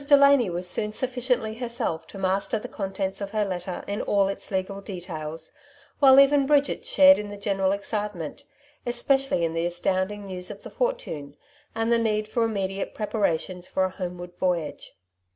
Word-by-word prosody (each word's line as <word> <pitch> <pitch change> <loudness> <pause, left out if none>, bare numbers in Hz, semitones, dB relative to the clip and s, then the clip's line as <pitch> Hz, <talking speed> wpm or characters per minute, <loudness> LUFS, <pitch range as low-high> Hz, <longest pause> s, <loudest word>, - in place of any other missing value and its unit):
Delany 280 -5 +6
was 175 +1 -2
soon 210 +3 -1
suffi 255 +2 -2
ciently 235 -3 0
herself 235 -10 -2
to - - -11
master 195 +3 0
the 215 - -6
contents 195 0 -3
of 200 - -3
her 210 0 0
letter 180 -1 -4
in 200 +1 -3
all 200 -1 +2
its 195 - -4
legal 195 +1 -2
details, 165 -5 -6 0.5
while 270 -1 +8
even 275 0 +5
Bridget 290 - +2
shared 285 - +7
in 210 0 -5
the 205 - -7
general 195 -2 0
excitement, 200 -5 -4 0.4
especially 245 -5 +2
in 165 - -2
the 165 +1 0
astounding 185 +3 -1
news 180 -2 -6
of 205 -1 -9
the - - -9
fortune, 320 - -3 0.4
and 225 +1 0
the 235 - +4
need 215 -2 0
for 230 +2 0
inunediate 195 -2 -3
preparations 185 -4 -1
for 190 - 0
a 185 - 0
homeward 175 -1 -6
voyage. 175 -5 -2
200 Hz, 170 wpm, -26 LUFS, 180-235 Hz, 0.5 s, while